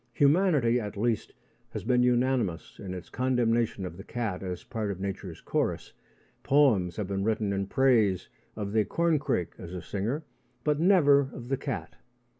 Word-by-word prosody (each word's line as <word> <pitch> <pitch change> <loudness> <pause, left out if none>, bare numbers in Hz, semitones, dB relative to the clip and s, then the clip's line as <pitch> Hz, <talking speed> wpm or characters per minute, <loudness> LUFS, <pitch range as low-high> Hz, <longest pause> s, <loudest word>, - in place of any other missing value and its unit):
Humanity, 145 -6 +3
at 105 -2 -6
least, 115 0 0 0.4
has - - -6
been 125 -1 +3
unanimous 125 -7 +1
in 95 -2 -5
its 90 - -8
condemnation 120 -5 +1
of 85 -1 -7
the 95 - -9
cat 110 -5 -3
as 90 -2 -5
part 110 -4 -3
of 95 -2 -4
nature's 95 -3 -5
chorus. - - -2 0.5
Poems 110 - +3
have 105 - -2
been 95 0 -2
written 110 -2 0
in 100 0 -1
praise 110 -7 +3 0.3
of 105 -2 -4
the 110 0 +3
corncrake 150 - 0
as 90 +1 -7
a 90 - -5
singer, 115 - -2 0.4
but 150 -1 +1
never 145 -7 +5
of 120 -1 -9
the 135 - +1
cat. 135 -2 -5
115 Hz, 165 wpm, -28 LUFS, 95-135 Hz, 0.5 s, never